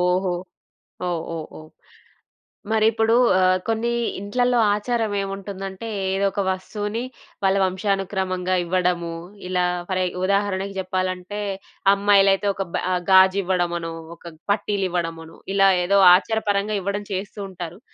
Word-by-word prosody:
ఓహో! 180 Hz, +1 st, +1 dB, 0.7 s
ఓహ్! 170 Hz, -2 st, -1 dB
ఓహ్! 160 Hz, -1 st, -5 dB
ఓహ్! 155 Hz, 0 st, -13 dB, 1.0 s
మరిప్పుడూ 225 Hz, +1 st, +3 dB, 0.3 s
ఆహ్, 185 Hz, 0 st, +4 dB
కొన్ని 225 Hz, +1 st, 0 dB, 0.3 s
ఇంట్లల్లో 245 Hz, +5 st, +1 dB, 0.2 s
ఆచారమేవుంటుందంటే, 200 Hz, -3 st, -3 dB, 0.2 s
ఏదొక 195 Hz, +1 st, 0 dB
వస్తువుని 205 Hz, +4 st, -3 dB, 0.4 s
వాళ్ళ 195 Hz, 0 st, +3 dB
వంశానుక్రమంగా 190 Hz, -1 st, -1 dB
ఇవ్వడము. 175 Hz, -1 st, 0 dB, 0.3 s
ఇలా 180 Hz, -1 st, +1 dB, 0.3 s
ఫరె 185 Hz, -1 st, 0 dB, 0.2 s
ఉదాహరణకి 200 Hz, 0 st, 0 dB
జెప్పాలంటే, 185 Hz, +1 st, -3 dB, 0.5 s
అమ్మాయిలైతే 200 Hz, 0 st, +4 dB
ఒక 195 Hz, 0 st, -3 dB
బె -, -, 0 dB
ఆహ్, 180 Hz, -, 0 dB
గాజివ్వడమనో, 185 Hz, -3 st, +3 dB, 0.2 s
ఒక 170 Hz, 0 st, -11 dB, 0.2 s
పట్టీలివ్వడమనో, 175 Hz, -6 st, -2 dB, 0.2 s
ఇలా 195 Hz, 0 st, +6 dB, 0.2 s
ఏదో 200 Hz, +2 st, +4 dB, 0.2 s
ఆచారపరంగా 210 Hz, 0 st, 0 dB
ఇవ్వడం 200 Hz, +2 st, -3 dB
చేస్తూ 195 Hz, +2 st, -4 dB
ఉంటారు. 175 Hz, -1 st, -8 dB
195 Hz, 105 wpm, -23 LUFS, 180-205 Hz, 1.0 s, ఇలా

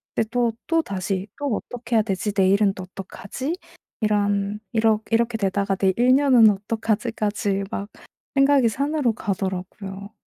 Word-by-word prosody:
근데 225 Hz, -, +1 dB
또 240 Hz, -1 st, +2 dB, 0.2 s
또 330 Hz, -1 st, +3 dB
다시 190 Hz, -, -3 dB
또 285 Hz, -6 st, 0 dB
어떻게 240 Hz, +1 st, -4 dB
해야 220 Hz, -, +4 dB
되지? 200 Hz, 0 st, -2 dB
내일은 195 Hz, +1 st, +4 dB
또 185 Hz, -, -6 dB
어떡하지? 200 Hz, -, -6 dB, 0.4 s
이런 205 Hz, -1 st, +1 dB
이러 220 Hz, -1 st, +3 dB
이렇게 230 Hz, 0 st, +2 dB
되다가 195 Hz, 0 st, 0 dB
내 190 Hz, 0 st, +2 dB
1 250 Hz, +2 st, +5 dB
년은 260 Hz, -6 st, +6 dB
어떡하지?' 220 Hz, +3 st, -2 dB
까지 205 Hz, -2 st, -1 dB
막 200 Hz, +1 st, -4 dB, 0.5 s
생각이 275 Hz, -3 st, +5 dB
산으로 280 Hz, +1 st, 0 dB
가더라고요. 195 Hz, 0 st, -5 dB
210 Hz, 310 characters per minute, -23 LUFS, 195-235 Hz, 0.5 s, 년은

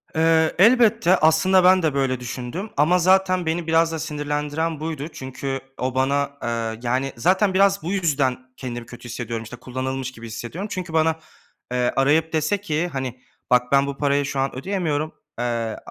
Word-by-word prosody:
Eee, 160 Hz, 0 st, +3 dB
elbette, 210 Hz, -3 st, +5 dB
aslında, 175 Hz, +4 st, +4 dB
ben 185 Hz, 0 st, +5 dB
de, 155 Hz, -3 st, +1 dB
böyle, 135 Hz, -2 st, 0 dB
düşündüm 125 Hz, -, -5 dB
ama 165 Hz, +5 st, +4 dB
zaten 185 Hz, 0 st, +3 dB
beni 165 Hz, +1 st, -2 dB
biraz 165 Hz, 0 st, +3 dB
da 160 Hz, -, -3 dB
sinirlendiren 150 Hz, +1 st, -2 dB
buydu. 155 Hz, -2 st, -4 dB
Çünkü 135 Hz, -2 st, -5 dB, 0.2 s
o, 130 Hz, 0 st, -2 dB
bana, 140 Hz, +2 st, 0 dB
eee, 115 Hz, -1 st, -2 dB
yani, 130 Hz, +3 st, -1 dB
zaten 190 Hz, -, +2 dB
biraz 195 Hz, +1 st, +3 dB
bu 170 Hz, -, -3 dB
yüzden 145 Hz, -9 st, +1 dB, 0.2 s
kendimi 120 Hz, -3 st, -6 dB
kötü 120 Hz, +1 st, -11 dB
hissediyorum. 115 Hz, -1 st, -4 dB
İşte, 115 Hz, +2 st, -9 dB
kullanılmış 130 Hz, +1 st, -4 dB
gibi 115 Hz, -2 st, -10 dB
hissediyorum. 120 Hz, -, -6 dB
Çünkü 180 Hz, -3 st, -5 dB
bana, 160 Hz, 0 st, +3 dB, 0.6 s
eee, 125 Hz, -1 st, +1 dB
arayıp 150 Hz, +5 st, +2 dB
dese 160 Hz, +6 st, 0 dB
ki, 170 Hz, -3 st, -1 dB
hani, 130 Hz, -5 st, -5 dB, 0.3 s
"Bak 125 Hz, 0 st, +3 dB
ben 140 Hz, 0 st, +4 dB
bu 140 Hz, -1 st, -5 dB
parayı 140 Hz, -1 st, +1 dB
şu 140 Hz, -1 st, -3 dB
an 135 Hz, -1 st, -1 dB
ödeyemiyorum," 155 Hz, -1 st, -2 dB, 0.3 s
eee, -, -, 0 dB, 0.3 s
ı -, -, -7 dB
145 Hz, 175 wpm, -22 LUFS, 130-170 Hz, 0.6 s, elbette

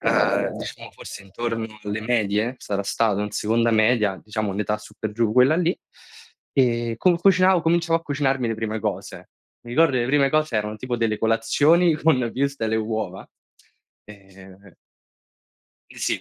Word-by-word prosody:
uhm -, -, +1 dB
diciamo -, -, -8 dB
forse -, -, -10 dB
intorno 115 Hz, +3 st, -4 dB, 0.2 s
alle 105 Hz, +1 st, -3 dB
medie, 110 Hz, +1 st, 0 dB
sarà 100 Hz, -1 st, -3 dB
stato 105 Hz, 0 st, 0 dB
in 105 Hz, 0 st, -3 dB
seconda 115 Hz, +3 st, +1 dB
media, 110 Hz, -3 st, +2 dB
diciamo 105 Hz, -1 st, -3 dB
un'età 105 Hz, +2 st, -2 dB
su 110 Hz, -, -15 dB
per 110 Hz, -, -4 dB
giù 110 Hz, 0 st, 0 dB
quella 130 Hz, +6 st, +5 dB
lì, 175 Hz, 0 st, +1 dB, 0.8 s
ehm, 120 Hz, -3 st, +1 dB
con 175 Hz, +8 st, +3 dB
cucinavo 185 Hz, 0 st, +4 dB
cominciavo 165 Hz, 0 st, +2 dB
a -, -, -23 dB
cucinarmi 135 Hz, -5 st, -1 dB
le 115 Hz, -, -1 dB
prime 110 Hz, 0 st, -4 dB
cose. -, -, -5 dB, 0.4 s
Mi 120 Hz, -, -10 dB
ricordo 160 Hz, +5 st, +3 dB
che 130 Hz, -, +1 dB
le 120 Hz, -, -1 dB
prime 140 Hz, +1 st, +3 dB
cose 155 Hz, -5 st, +1 dB
erano 105 Hz, 0 st, -2 dB
tipo 125 Hz, +2 st, -4 dB
delle 110 Hz, -2 st, -1 dB
colazioni 145 Hz, +10 st, +3 dB
con 155 Hz, -3 st, +2 dB
wurstel 140 Hz, -4 st, -1 dB
e -, -, +2 dB
uova, 110 Hz, -4 st, -3 dB, 0.8 s
e 95 Hz, -2 st, -16 dB, 1.2 s
Sì, -, -, -2 dB
115 Hz, 160 wpm, -23 LUFS, 105-140 Hz, 1.2 s, quella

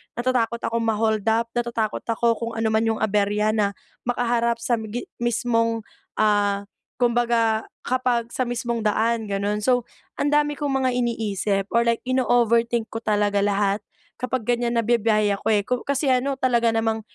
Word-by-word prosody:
natatakot 240 Hz, -1 st, 0 dB
akong 230 Hz, 0 st, -1 dB
ma-hold 220 Hz, -1 st, +1 dB
up, 230 Hz, +1 st, +2 dB
natatakot 230 Hz, -3 st, -1 dB
ako 230 Hz, +1 st, 0 dB
kung 230 Hz, 0 st, -4 dB
ano 225 Hz, 0 st, 0 dB
man 220 Hz, +1 st, +2 dB
yung 225 Hz, -1 st, 0 dB
aberya 210 Hz, 0 st, +1 dB
na 200 Hz, -2 st, +1 dB, 0.3 s
makaharap 235 Hz, -1 st, +1 dB
sa 240 Hz, 0 st, +1 dB
gi 220 Hz, +2 st, -5 dB
mismong, 230 Hz, -1 st, 0 dB, 0.4 s
ah, 205 Hz, -1 st, +2 dB, 0.4 s
kumbaga, 235 Hz, -2 st, +2 dB, 0.2 s
kapag 245 Hz, -2 st, 0 dB
sa 255 Hz, -, -1 dB
mismong 235 Hz, -1 st, -2 dB
daan 225 Hz, +2 st, +1 dB
ganun. 200 Hz, +1 st, -1 dB
So, 245 Hz, -1 st, +2 dB, 0.4 s
ang 285 Hz, -, +2 dB
dami 295 Hz, 0 st, +3 dB
kong 290 Hz, -2 st, -1 dB
mga 255 Hz, -, +3 dB
iniisip, 215 Hz, -5 st, -1 dB
or 235 Hz, -, +4 dB
like, 230 Hz, 0 st, +2 dB
inooverthink 235 Hz, -2 st, +2 dB
ko 225 Hz, -, -4 dB
talaga 205 Hz, -1 st, +1 dB
lahat 200 Hz, 0 st, +1 dB, 0.4 s
kapag 250 Hz, -3 st, -2 dB
ganyan 240 Hz, -1 st, +1 dB
na 230 Hz, -, +1 dB
bibiyahe 215 Hz, -3 st, +2 dB
ako 200 Hz, -, -6 dB
eh. 205 Hz, -1 st, +3 dB
Kasi 270 Hz, +3 st, -1 dB
ano, 265 Hz, +2 st, 0 dB
talaga 235 Hz, -3 st, +2 dB
namang 225 Hz, 0 st, 0 dB
230 Hz, 155 wpm, -23 LUFS, 215-240 Hz, 0.4 s, or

